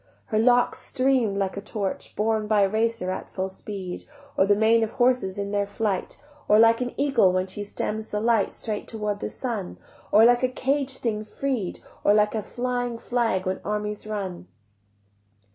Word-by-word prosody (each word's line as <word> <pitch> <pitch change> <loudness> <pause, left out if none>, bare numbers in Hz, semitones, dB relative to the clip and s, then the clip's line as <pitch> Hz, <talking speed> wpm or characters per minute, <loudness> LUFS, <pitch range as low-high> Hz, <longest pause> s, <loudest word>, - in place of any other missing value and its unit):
Her 215 - 0
locks 245 +2 +3
stream'd 255 -6 +1
like 195 -1 0
the 200 - -5
torch 200 -1 -4
Borne 215 0 0
by 210 -1 +3
a 195 - +5
racer 225 -2 0
at - - -5
full 190 0 -3
speed, 190 -1 -7 0.3
Or 190 - +4
like - - -5
the 205 - +5
mane 225 +2 +4
of 220 - -3
horses 245 -7 +2
in 200 0 -3
their 205 -1 0
flight, 205 -2 -2 0.3
Or 210 - +6
like 230 +2 +5
an 245 0 -3
eagle 265 -10 +4
when 185 0 0
she 190 +2 -6
stems 215 +1 -4
the 210 - -2
light 225 -2 +2
Straight 215 -2 -4
toward 210 -2 -3
the - - -3
sun, 225 -8 -4 0.3
Or 220 +2 +7
like 245 0 +5
a 255 - +2
caged 270 +1 -1
thing 215 -3 -1
freed, 235 -3 -3 0.2
Or 205 - +5
like 210 0 +3
a 220 - -1
flying 245 +1 -3
flag 230 -5 0
when 185 0 -2
armies 210 0 -3
run. 195 - -5
215 Hz, 190 wpm, -25 LUFS, 200-240 Hz, 0.3 s, Or